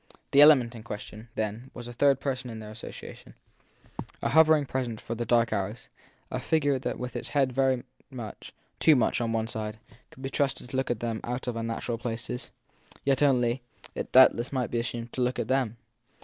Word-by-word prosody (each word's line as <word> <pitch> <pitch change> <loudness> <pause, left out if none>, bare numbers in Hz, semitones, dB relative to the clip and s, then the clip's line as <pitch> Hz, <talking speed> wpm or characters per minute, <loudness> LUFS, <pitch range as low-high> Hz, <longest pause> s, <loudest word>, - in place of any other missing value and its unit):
The 140 - +7
element 135 -6 +7
in 115 - -9
question, 110 0 -8
then, 110 +4 -3
was 120 - -7
a 120 - -7
third 140 +2 +3
person 130 -3 -3
in 115 - -6
their 105 -1 -8
association, 110 +2 -10 0.9
a - - +1
hovering 155 -1 +5
presence 125 -4 -3
for 115 - -5
the 120 0 -4
dark 115 -1 +3
hours, 105 +4 -3 0.4
a - - -1
figure 145 -4 +1
that - - -3
with 125 0 -6
its - - -3
head 135 -3 +1
very 130 -1 +2 0.3
much 120 -5 -8 0.3
too 155 - +6
much 120 -1 +2
on 115 -1 0
one 110 -1 0
side, 110 -1 -4 0.3
could 130 - -14
be 135 - -2
trusted 135 -3 -1
to - - -5
look 130 0 0
at 120 -2 -1
them 115 -2 -2
out 125 +2 -3
of 125 - -2
unnatural 115 0 -3
places; 120 +1 -4 0.6
yet 135 0 +2
only, 125 -3 +3 0.3
it - - -5
doubtless 130 -1 +6
might 130 -4 -1
be 120 - 0
assumed, 115 0 -4
to 130 - -2
look 125 +1 +1
at 110 - -2
them. 130 -4 +1
120 Hz, 200 wpm, -28 LUFS, 115-135 Hz, 0.9 s, The